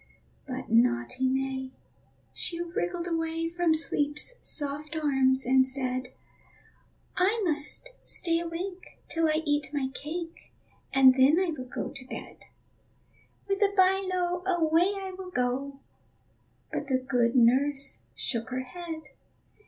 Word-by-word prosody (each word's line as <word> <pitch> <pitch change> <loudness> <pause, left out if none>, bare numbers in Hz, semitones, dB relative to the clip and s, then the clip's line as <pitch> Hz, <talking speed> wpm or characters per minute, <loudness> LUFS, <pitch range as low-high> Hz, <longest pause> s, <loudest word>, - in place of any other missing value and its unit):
But - - -6
naughty 120 - +2
May, 265 0 -2 0.6
she 340 - 0
wriggled 345 0 -2
away 330 -1 -1
From 340 -1 +2
Sleep's 305 +5 +1
soft 295 +1 -3
arms, 270 -4 +2
and 260 +1 +4
said: 255 -1 -2 1.1
"I 400 +5 +3
must 310 +10 +1
stay 335 -1 +1
awake 355 +3 -6
till 330 -1 +1
I 310 +1 +1
eat 290 -1 +1
my 280 -3 -1
cake, 330 +4 -7 0.4
And 265 -1 +7
then 270 +6 +5
I 370 -3 +1
will 255 -3 -7
go - - -4
to 275 -3 -7
bed; - - -9 1.0
With 395 0 -1
a 405 -1 +4
by 380 +1 +5
lo, 355 -1 0
away 345 +1 +3
I 380 -1 -6
will 370 -1 -8
go." 270 0 -2 0.9
But 295 - -3
the 260 -2 +2
good 245 -2 +1
nurse 270 +3 +3 0.2
shook 230 -2 -2
her 255 0 -2
head. 325 +3 -7
300 Hz, 130 wpm, -28 LUFS, 260-345 Hz, 1.1 s, And